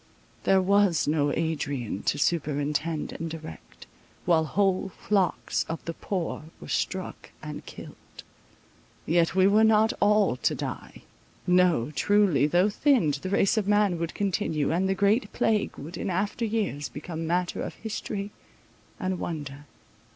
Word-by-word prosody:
There 190 -1 +4
was 200 -5 +3
no 145 -1 +2
Adrian 145 - -2
to - - -1
superintend 150 0 -1
and 165 0 -5
direct, 155 - -10 0.4
while 165 -2 +3
whole 190 +4 +1
flocks 195 -1 0
of 165 - -5
the 165 - -3
poor 170 -4 -4
were 75 - -11
struck - - -3
and - - -6
killed. - - -12 0.8
Yet 165 +1 +2
we 190 0 +5
were 210 +3 +5
not 220 0 +4
all 210 -10 +3
to - - 0
die. - - -7 0.4
No 180 -8 +3
truly, 185 -5 +3
though 175 +5 +3
thinned, 205 - +2
the 185 - -4
race 200 +2 +2
of 205 -2 0
man 205 -4 +2
would 170 0 -3
continue, 165 -7 0
and 185 +3 +1
the 195 - +1
great 205 +2 +2
plague 215 -2 0
would, 165 +5 -8
in - - -3
after 200 +6 -1
years, 205 -10 -2
become 160 +2 -6
matter 175 +1 -1
of - - -5
history 205 -2 -5 0.7
and 185 -2 -2
wonder. 145 -3 -5
175 Hz, 145 wpm, -27 LUFS, 155-200 Hz, 0.8 s, we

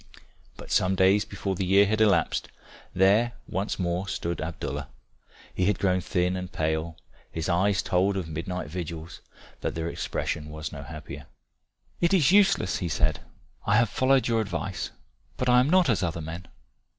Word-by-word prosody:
But - - -10
some 95 +1 +3
days 95 +2 +4
before 100 0 -3
the 95 - -2
year 100 +2 +5
had 110 +2 0
elapsed, 100 -6 +2 0.4
there 105 +6 +3
once 95 +4 -2
more 90 +1 -1
stood 85 -2 -3
Abdallah. 70 -3 -4 0.7
He 90 - 0
had 105 -2 +2
grown 95 -1 +1
thin 90 0 0
and 90 0 -5
pale, 80 0 -2 0.3
his 80 -1 -3
eyes 95 +2 +2
told 95 +2 +1
of 90 -4 -3
midnight 85 +3 -4
vigils, 85 0 -6 0.4
but - - -3
their 80 0 -2
expression 75 -2 -3
was 75 -1 -6
no 70 - -7
happier. 75 +1 -9 0.7
"It 170 +3 +3
is 165 -4 +4
useless," 195 - +4
he 90 - -2
said. - - +1 0.5
"I 100 - +4
have 115 -1 +4
followed 130 +2 +3
your 115 -2 +2
advice. 95 -1 -3 0.5
But 125 - 0
I 125 0 +6
am 130 +3 +2
not 185 0 +5
as 115 -5 +2
other 85 -2 -2
men. 85 +3 -7
95 Hz, 170 wpm, -27 LUFS, 85-105 Hz, 0.7 s, I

